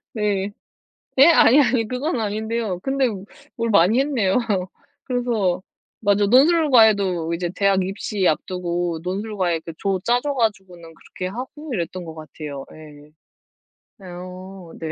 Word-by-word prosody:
네. 205 -3 -1 0.7
네? 275 +4 +8
아니, 280 -1 +6
아니. 240 -3 +1
그건 255 +1 -2
아닌데요. 215 -2 -2
근데 270 -1 +1 0.5
뭘 230 -1 -1
많이 200 +5 +4
했네요. 250 -9 +1 0.7
그래서 225 -8 -1 0.4
맞아. 205 -1 +2
논술 295 +7 +4
과외도 200 -8 +4
이제 175 0 -3
대학 195 -1 +2
입시 195 0 -1
앞두고 175 0 -2
논술 205 +4 -4
과외 175 -3 0
그 165 - -9
조 195 -2 0
짜 245 +1 +2
줘 290 -1 -2
가지고는 190 -8 -3
그렇게 185 - -8
하고 260 +7 -7
이랬던 175 0 -4
것 160 -1 -9
같아요. 150 -3 -8
예. 150 -1 -14 1.0
어. 185 0 -10
네. 160 -1 -4
195 Hz, 265 characters per minute, -22 LUFS, 175-235 Hz, 1.0 s, 네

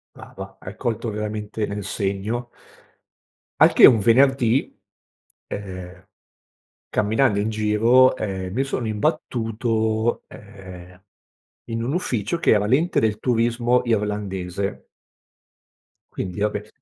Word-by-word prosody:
Brava, - - -10
hai 95 +3 -9
colto 115 -1 -2
veramente 105 0 -4
nel 100 -1 -5
segno. 100 +6 -3 1.1
Al - - +7
che, - - +8
un 115 - +6
venerdì, 125 +2 +3 0.8
ehm, 95 -2 -8 0.8
camminando 110 0 +1
in 105 - -1
giro, 110 +4 +4
ehm, 95 -5 -4
mi 130 - +1
sono 130 -3 -3
imbattuto, 110 -2 -1
ehm, 95 -3 -13 0.7
in 115 0 -2
un 130 +6 -2
ufficio 125 - -1
che - - +2
era 105 -1 +2
l'ente 145 +10 +2
del 110 -1 0
turismo 120 +1 +1
irlandese. 100 -4 -2 1.3
Quindi 95 +2 -5
va 105 - +2
beh. 105 +1 -6
110 Hz, 110 wpm, -22 LUFS, 100-120 Hz, 1.3 s, che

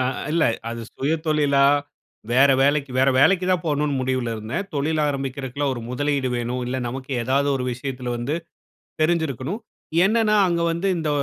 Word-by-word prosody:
அ - - 0 0.3
இல்ல 165 -1 +2 0.3
அது 115 0 -5 0.2
சுயதொழிலா? 150 -1 +2 0.7
வேற 135 +3 +6
வேலைக்கு 140 0 +2
வேற 135 +1 +4
வேலைக்கு 180 +7 +4
தான் 185 -1 +1
போணும்னு 150 -2 0
முடிவுல 130 -2 -1
இருந்தேன். 110 - -4
தொழில் 155 +2 0
ஆரம்பிக்கிறதுக்குலாம் 135 0 -2
ஒரு 120 - -6
முதலீடு 140 +1 0
வேணும், 120 +1 -2
இல்ல 125 +1 -2
நமக்கு 130 +2 -6
ஏதாவது 140 +3 +1
ஒரு 125 - -3
விஷயத்துல 125 -1 -4
வந்து 120 +6 -2 0.7
தெரிஞ்சிருக்கணும். 160 - 0 0.5
என்னன்னா 215 0 +3
அங்க 170 -1 0
வந்து 170 +4 -1
இந்த 160 -2 -2
140 Hz, 150 wpm, -23 LUFS, 130-160 Hz, 0.7 s, வேற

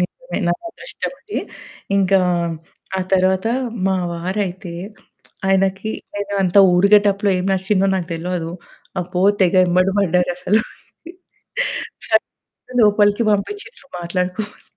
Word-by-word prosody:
నిజమే. - - -4
నా - - +3 0.2
అదృష్టమది. 465 +2 -6 0.6
ఇంకా 195 0 +4 0.8
ఆ - - 0
తరవాత 190 +2 +3 0.4
మా 190 -1 +2 0.2
వారయితే 180 0 -3 0.7
ఆయనకి 195 +2 +1 0.2
నేనంత 200 -2 +1 0.2
ఊరు 190 +3 +4
గేటప్పులో 205 -1 +3
ఏం 180 - -2
నచ్చిందో 190 +1 +1
నాకు 180 -2 -2
తెలవదు. 165 0 -3 0.5
అబ్బో! 180 +1 -2 0.2
తెగ 180 +1 +3
ఎంబడ 185 +1 +3
పడ్డారసలు. 180 +2 +2 2.1
నన్ను 250 0 -3
లోపలికి 205 +1 +4
పంపిచ్చిన్రు 340 - -4
మాట్లాడుకోమని. 180 +4 -3
190 Hz, 100 wpm, -20 LUFS, 180-205 Hz, 2.1 s, ఇంకా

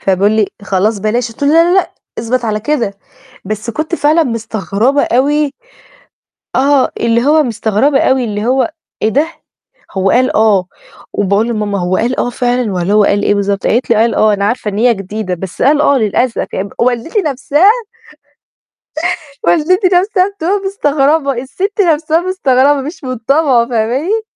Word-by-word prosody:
فبيقول 195 +2 +1
لي: 220 -2 +2 0.2
"خلاص 200 +2 0
بلاش." 230 +3 -1
قلت 230 - -13
له: 285 - +3
"لأ 335 +3 +4
لأ، 380 - +1 0.3
اثبت 240 +2 -1
على 215 -1 -1
كده." 230 -5 -1 0.5
بس 215 +3 -4
كنت 310 +6 -3
فعلًا 315 +1 +2
مستغربة 230 +2 -1
أوي. 285 +3 +1 1.0
آه، 275 0 +2
اللي 235 +1 +1
هو 305 +1 +4
مستغربة 230 +4 +1
أوي، 260 -1 +2
اللي 210 -1 -3
هو: 260 +5 +1 0.3
"إيه 220 - +2
ده؟" 290 +7 +1 0.7
هو 195 0 0
قال: 255 +4 +2
"آه"، 205 -4 +3 0.5
وباقول 205 +3 0
لماما: 210 -3 -2
"هو 180 +1 0
قال 240 +3 -1
آه 245 - 0
فعلًا 245 -2 -1
والّا 180 +1 -1
هو 210 -1 +5
قال 205 0 +1
إيه 205 - +2
بالضبط؟" 200 -1 -1
قالت 240 +3 0
لي: 230 - +4
"قال 225 +1 +2
آه. 215 -1 +3
أنا 200 - -2
عارفة 225 0 -1
إن 205 - -3
هي 240 +1 +3
جديدة، 195 -1 -4
بس 180 +1 -6
قال: 290 +2 +3
'آه' 280 -2 +3
للأسف." 230 +3 0
ي 195 +1 -3
والدتي 250 - 0
نَفْسها 290 +7 +2 1.7
والدتي 365 +4 +2
نَفْسها 370 +1 +2
بتبقى 400 0 -2
مستغربة، 290 -5 +1
الست 395 +10 -2
نَفْسها 320 -2 +2
مستغربة، 290 -6 +2
مش 305 +3 -8
من 255 -1 -4
طابعه، 255 0 +2
فاهماني؟ 260 - 0
245 Hz, 165 wpm, -13 LUFS, 215-295 Hz, 1.7 s, هو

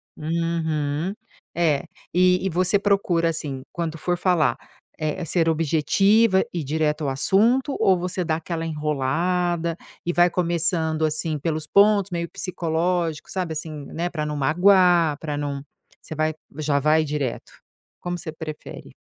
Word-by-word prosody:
Uhum, 160 0 -1 0.4
é, 160 -5 +1 0.3
e 180 +2 +3
você 185 +3 +2
procura, 195 -5 +2
assim, 145 -5 -4
quando 165 -2 -3
for 175 +2 0
falar, 165 -9 +2 0.4
eh, 155 +3 -2
ser 165 +1 +1
objetiva, 190 +7 +3
ir 170 -3 -3
direto 150 +1 -1
ao 140 - 0
assunto, 230 - +2
ou 185 -2 +4
você 180 +1 -2
dá 160 -2 0
aquela 165 0 -4
enrolada 165 +3 -1 0.3
e 175 - -1
vai 175 0 +5
começando, 165 -2 0
assim, 155 0 -1
pelos 155 0 -3
pontos 200 0 +4
meio 170 -2 -3
psicológicos, 170 -2 -2
sabe, 180 -4 -2
assim, 155 -2 -6
né, 170 +2 -2
para 155 -3 -3
não 150 0 -3
magoar, 175 +1 +4
para 150 -2 -4
não 140 -1 -3 0.4
Você 160 - -8 0.4
já 150 -2 +1
vai 155 +2 +3
direto? 145 -5 -4 0.5
Como 175 0 -4
você 160 - -6
prefere? 155 -1 -9
165 Hz, 140 wpm, -23 LUFS, 155-180 Hz, 0.5 s, vai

